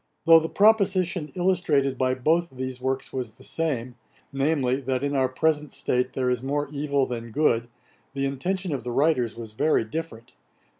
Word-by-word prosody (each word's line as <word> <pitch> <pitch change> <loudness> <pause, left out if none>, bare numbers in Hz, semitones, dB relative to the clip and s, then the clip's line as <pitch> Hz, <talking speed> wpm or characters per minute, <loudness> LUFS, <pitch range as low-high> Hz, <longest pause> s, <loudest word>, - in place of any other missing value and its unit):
Though 165 0 +8
the 160 0 -4
proposition 190 -6 +2
illustrated 165 -7 +1
by 130 0 +1
both 165 +7 +1
these 130 -1 -6
works 130 +1 -2
was 125 -4 -4
the - - -18
same, 130 -7 -2 0.4
namely, 135 -2 +1
that 130 0 -2
in 145 0 -1
our 130 -1 +2
present 150 +2 0
state 125 0 -1
there 130 -1 0
is 125 -2 -1
more 145 +2 -1
evil 140 -2 0
than 115 -2 -5
good, 120 -2 +1 0.5
the 135 0 0
intention 175 +6 -2
of 130 -4 -4
the 125 - -4
writers 130 -4 +1
was 110 -2 -8
very 155 +3 +2
different. 115 -1 -7
135 Hz, 170 wpm, -25 LUFS, 125-160 Hz, 0.5 s, Though